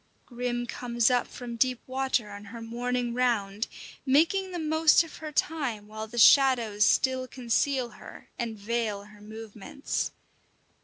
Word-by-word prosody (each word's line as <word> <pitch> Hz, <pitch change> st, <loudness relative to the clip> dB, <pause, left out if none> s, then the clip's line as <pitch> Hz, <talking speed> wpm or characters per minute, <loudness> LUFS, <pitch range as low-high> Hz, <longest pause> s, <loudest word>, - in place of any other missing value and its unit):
Grim 240 Hz, -1 st, -3 dB
comes 240 Hz, 0 st, 0 dB
up 245 Hz, -1 st, +2 dB
from 240 Hz, -2 st, -7 dB
deep 255 Hz, 0 st, +2 dB
water 260 Hz, -4 st, -1 dB
on 205 Hz, 0 st, -9 dB
her 230 Hz, +4 st, -9 dB
morning 240 Hz, +1 st, -2 dB
round, 225 Hz, -4 st, 0 dB, 0.4 s
making 335 Hz, +8 st, +3 dB
the 360 Hz, -, -5 dB
most 315 Hz, 0 st, +4 dB
of 330 Hz, -, -11 dB
her 310 Hz, -1 st, -7 dB
time 275 Hz, -9 st, -1 dB
while 215 Hz, +1 st, -6 dB
the 240 Hz, +2 st, -10 dB
shadows 235 Hz, -5 st, +5 dB
still 260 Hz, +3 st, +2 dB
conceal 255 Hz, +1 st, 0 dB
her -, -, -13 dB
and 230 Hz, -2 st, -3 dB
veil 215 Hz, -1 st, -2 dB
her 210 Hz, 0 st, -16 dB
movements. 220 Hz, +6 st, -5 dB
240 Hz, 145 wpm, -28 LUFS, 220-265 Hz, 0.4 s, shadows